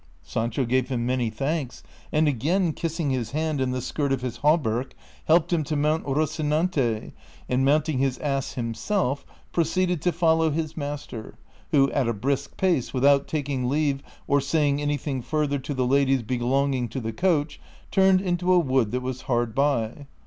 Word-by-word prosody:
Sancho 115 +3 -1
gave 130 +2 +1
him 120 -3 -1
many 125 -2 0
thanks, 135 +4 -3 0.3
and 155 +1 +3
again 160 - +1
kissing 165 -3 -2
his 125 -4 -1
hand 155 -2 -1
and 130 -1 0
the 125 -1 -3
skirt 140 +1 -1
of 135 -2 0
his 125 -2 -4
hauberk, 135 -5 +1 0.4
hel})ed 170 +1 +4
him 165 -3 +2
to 150 +2 -3
mount 150 +2 +1
Kocinante, 150 -4 0 0.4
and 125 +1 +1
mounting 145 0 +2
his 135 -1 +1
ass 135 -3 -2
himself, 125 - -2 0.2
proceeded 175 0 +1
to 180 - +2
follow 160 -1 +3
his 155 +1 -2
master, 145 -7 -6 0.3
who 135 -2 +4
at 135 -4 +1
a 115 - +1
brisk 135 +6 -2
pace, 175 -10 +1
without 140 +2 +4
taking 135 -4 -2
leave, 140 -1 +1 0.2
or 140 0 +2
saying 145 0 +1
anything 145 -2 -2
further 145 +1 -1
to 140 +2 -5
the 130 -1 +1
ladies 135 -1 +2
belonging 130 +1 0
to 125 - -4
the 115 -2 -4
coach, 155 0 0 0.3
turned 190 -1 +4
into 180 -1 0
a 180 - +6
wood 130 -8 +2
that 125 +3 -2
was 130 0 -4
hard 120 -2 +1
by. 140 -1 0
140 Hz, 170 wpm, -25 LUFS, 125-155 Hz, 0.4 s, a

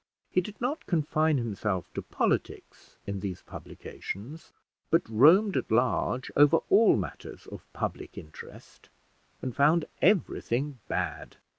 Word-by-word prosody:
He 185 - +3
did 205 +3 -10
not 265 +6 -3
confine 155 -2 +1
himself 105 - -3
to - - -4
politics - - -3
in 100 -1 -4
these 95 -2 -5
publications, 130 +12 -9 0.4
but 165 +2 +2
roamed 165 - +5
at - - -1
large 125 +2 +1
over 145 +3 +6
all 215 +2 +6
matters 95 - -6
of - - -12
public - - -5
interest, 75 0 -12 0.5
and 130 -2 -4
found 155 +3 +3 0.2
everything 145 - +1
bad. - - -4
145 Hz, 125 wpm, -28 LUFS, 110-170 Hz, 0.5 s, over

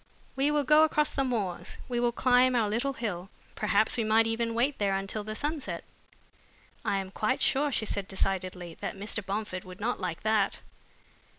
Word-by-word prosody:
We 270 +2 +2
will 295 -1 +2
go 300 +3 +6
across 300 -1 +2
the 275 - 0
moors, 215 -9 -2
we 245 -1 -1
will 240 0 +2
climb 250 +1 +4
our 225 -3 +3
little 235 +6 0
hill. 195 -7 -4 0.2
Perhaps 215 +2 +2
we 230 - +1
might 220 +1 +4
even 230 0 -1
wait 260 +5 +1
there 200 -2 +2
until 195 +2 -2
the 215 +1 -5
sunset." 295 +2 -3 1.0
"I 200 - +1
am 190 -1 -4
quite 220 +6 0
sure," 290 0 +2
she 225 - 0
said 200 -2 -3
decidedly, 185 -3 -2
"that - - -4
Mr. 210 +2 -2
Bomford 195 -2 -3
would 185 0 -11
not 235 +4 -1
like 180 -3 -3
that." 215 -2 +1
220 Hz, 185 wpm, -29 LUFS, 195-255 Hz, 1.0 s, go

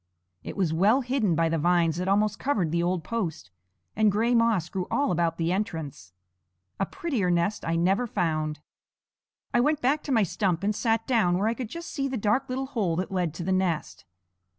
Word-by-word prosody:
It - - -8
was 180 -5 +1
well 205 +11 +4
hidden 245 -8 0
by 165 +1 +2
the 165 0 0
vines 170 0 +2
that 180 +1 -2
almost 205 +1 +2
covered 200 - 0
the 170 +1 +1
old 175 -1 0
post, 165 - -4 0.4
and 215 -1 +4
gray 225 +4 +1
moss 230 -7 +2
grew 185 -1 -4
all 285 -8 +1
about 170 -1 0
the 165 0 0
entrance. 160 - -4 0.7
A 195 - 0
prettier 255 - -2
nest 175 +4 0
I 165 - -1
never 190 +8 +2
found. 155 -6 -1 0.9
I 240 - +4
went 295 +4 +2
back 285 +4 +1
to 285 - -3
my 225 -4 +4
stump 185 -1 -1
and 210 +1 +1
sat 225 +1 0
down 210 -9 +2
where 200 +3 +1
I 225 - +2
could 235 -2 -6
just 335 +6 -7
see 275 -3 -1
the 265 -1 -3
dark 230 +6 0
little 260 +1 -2
hole 215 -11 -1
that 185 +4 -3
led 180 -4 0
to 170 - -5
the 190 - -1
nest. 185 - -1
195 Hz, 205 wpm, -26 LUFS, 170-230 Hz, 0.9 s, well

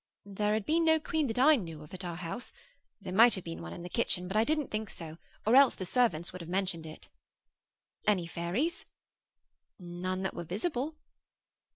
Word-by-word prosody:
There 210 +1 0
had 215 -2 -2
been 330 +2 +2
no 320 -1 +5
queen 310 -1 0
that 225 - -3
I 300 +5 +7
knew 165 -8 -7
of 150 - -15
at 185 0 -6
our 175 -2 -4
house. 180 +8 -5 0.5
There - - -6
might 230 +4 +7
have 190 - -6
been 80 0 -6
one 85 0 -7
in 170 - -8
the - - -5
kitchen: 180 -3 -1
but 190 - -5
I 215 - +5
didn't 300 +2 0
think 215 -1 -3
so, 165 -1 -8 0.3
or 220 - +3
the 265 -8 +6
servants 175 -7 +1
would 185 - -7
have 165 - -8
mentioned 180 -3 -2
it. 155 - -11 1.0
'Any 195 -5 +3
fairies?' 175 - -2 0.9
None 185 +1 -4
that 190 - -2
were 175 - -5
visible. 255 - -2
190 Hz, 195 wpm, -31 LUFS, 175-245 Hz, 1.0 s, I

